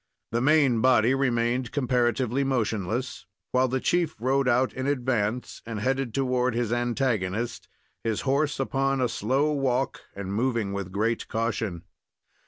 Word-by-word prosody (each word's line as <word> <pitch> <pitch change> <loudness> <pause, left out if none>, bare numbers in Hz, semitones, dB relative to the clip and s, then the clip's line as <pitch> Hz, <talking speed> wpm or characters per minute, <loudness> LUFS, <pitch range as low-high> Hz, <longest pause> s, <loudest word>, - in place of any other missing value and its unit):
The 120 +1 0
main 135 -4 +4
body 125 -1 +4
remained 125 -2 0
comparatively 125 -1 +1
motionless, 110 -4 -2 0.2
while 130 +1 +3
the 130 +1 -1
chief 175 +2 +1
rode 135 +3 +1
out 130 +1 +2
in 130 +1 -3
advance 125 -4 -1
and 115 -2 -5
headed 135 +2 0
toward 125 -1 0
his 120 -1 0
antagonist, 120 -3 -1 0.4
his 110 -2 -1
horse 140 +2 0
upon 135 0 0
a 125 - +2
slow 130 +7 0
walk, 135 -2 0
and 100 -1 -5
moving 115 -3 0
with 100 -2 -4
great 110 +4 -1
caution. 110 -6 -2
125 Hz, 140 wpm, -26 LUFS, 115-135 Hz, 0.4 s, main